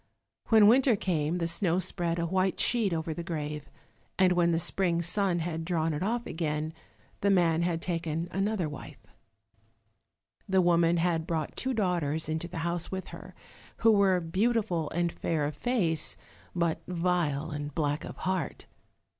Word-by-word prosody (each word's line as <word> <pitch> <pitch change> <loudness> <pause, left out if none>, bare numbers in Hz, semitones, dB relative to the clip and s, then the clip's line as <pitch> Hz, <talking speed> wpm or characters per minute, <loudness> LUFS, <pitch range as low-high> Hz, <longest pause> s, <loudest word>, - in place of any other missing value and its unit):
When 220 -2 +6
winter 250 +2 +5
came 170 -4 -1
the 170 -2 -1
snow 170 +1 +1
spread 175 -2 0
a 170 - 0
white 185 +2 0
sheet 230 -5 +2
over 160 -1 -2
the 170 - -5
grave, 150 -3 -5 0.5
and 185 -1 +4
when 175 -1 +3
the 165 - +2
spring 170 0 0
sun 180 +1 +1
had 165 -1 -3
drawn 165 -2 0
it 150 - -3
off 235 +5 -1
again, 155 -1 -2 0.5
the 200 - +1
man 170 -4 +3
had 170 -1 -1
taken 165 -1 -2
another 195 -2 0
wife. 145 -2 -10 1.4
The 190 0 +3
woman 170 -1 +3
had 165 -1 0
brought 160 -3 -2
two 260 -1 -1
daughters 170 -7 0
into 160 +2 -2
the 170 - -8
house 170 0 -1
with 190 0 -5
her, - - -11 0.5
who 225 - +8
were 195 -3 +4
beautiful 185 -2 0
and 175 0 0
fair 160 -3 -1
of 145 0 -3
face, 170 -7 0 0.4
but 170 -2 0
vile 170 -4 0
and 145 0 -4
black 145 -1 0
of - - -8
heart. 185 -5 -3
170 Hz, 165 wpm, -29 LUFS, 160-185 Hz, 1.4 s, who